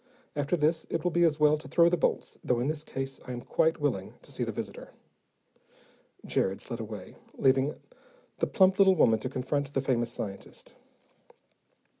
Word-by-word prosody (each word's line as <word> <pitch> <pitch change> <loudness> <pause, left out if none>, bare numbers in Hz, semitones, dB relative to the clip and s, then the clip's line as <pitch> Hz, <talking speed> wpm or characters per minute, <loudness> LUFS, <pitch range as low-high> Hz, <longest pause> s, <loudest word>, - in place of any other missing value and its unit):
After 145 +4 0
this, 160 +1 +1
it 165 - -2
will 180 - +1
be 175 +1 +3
as 155 -2 +3
well 150 0 +4
to - - -10
throw 170 -1 +5
the 175 - +3
bolts, 165 - -1
though 125 -1 +1
in 120 - 0
this 155 +1 -1
case 135 -2 -5
I 125 - -4
am 120 - -5
quite 160 +1 +1
willing 125 -11 -2
to - - -15
see - - -3
the - - -2
visitor." - - -7 1.4
Jared 95 +1 0
slid 115 - -6
away, 105 -4 -8 0.2
leaving 135 +2 +3 0.6
the - - +1
plump 190 0 +3
little 190 -1 +6
woman 115 -9 +4
to 130 - -4
confront 135 +2 -2
the 140 - 0
famous 120 -3 0
scientist. 100 -4 -7
145 Hz, 180 wpm, -29 LUFS, 120-160 Hz, 1.4 s, little